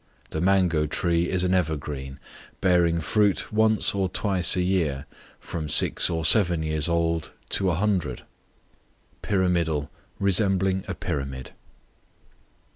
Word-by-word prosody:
The 80 - -3
mango 90 -5 +2
tree 85 +2 0
is 90 -1 -1
an 90 0 0
evergreen, 75 -6 -3 0.4
bearing 85 -2 +2
fruit 105 +5 0
once 110 0 +2
or 95 -2 -1
twice 95 -1 +1
a 90 - 0
year, 80 -7 -1 0.3
from 80 -3 -6
six - - +5
or 80 -1 -3
seven 90 -5 +3
years 80 0 -1
old 85 -1 -1 0.2
to 95 -2 +1
a 85 - 0
hundred. 90 - -2 1.0
Pyramidal, 85 -6 -1 0.3
resembling 95 -1 +1
a 95 - -4
pyramid. 70 -6 -5
85 Hz, 120 wpm, -24 LUFS, 80-95 Hz, 1.0 s, six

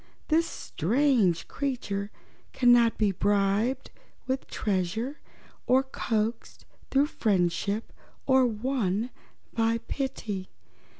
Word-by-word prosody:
This 330 +1 +3
strange 220 - +1
creature 205 -8 -3 0.4
cannot 240 -2 +5
be 210 -2 +2
bribed 200 +5 +1 0.3
with 260 0 -2
treasure, 210 - -2 0.5
or 260 +2 +5
coaxed 230 -3 -3 0.2
through 275 +1 +4
friendship, 200 - 0 0.3
or 260 -1 +5
won 230 -1 -1 0.4
by 225 0 +2
pity. 220 -9 -3
225 Hz, 85 wpm, -28 LUFS, 200-265 Hz, 0.5 s, cannot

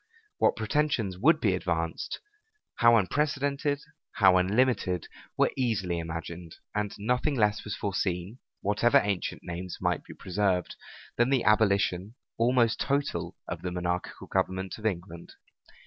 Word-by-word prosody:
What - - +4
pretensions 110 -5 0
would 155 - +5
be 105 -9 +2
advanced, 85 -3 -2 0.6
how 120 0 +6
unprecedented, 145 - 0 0.3
how 95 -7 +5
unlimited, 95 -2 +1 0.3
were - - +3
easily 100 -9 0
imagined; 85 +1 -6 0.2
and 105 -1 -1
nothing 125 +7 0
less 105 -3 +2
was 105 - -4
foreseen, 95 +2 -2 0.2
whatever 105 +4 +3
ancient 100 -3 -2
names 90 +1 -6
might - - 0
be - - -12
preserved, 95 -1 -1 0.4
than 120 +3 +3
an 135 -3 +3
abolition, 100 -1 +2 0.2
almost 120 -1 +3
total, 135 - -1
of 85 -1 -5
the 90 - -3
monarchical 90 0 -3
government 95 +2 -2
of 110 - 0
England. 85 -3 -5
100 Hz, 130 wpm, -28 LUFS, 90-120 Hz, 0.6 s, how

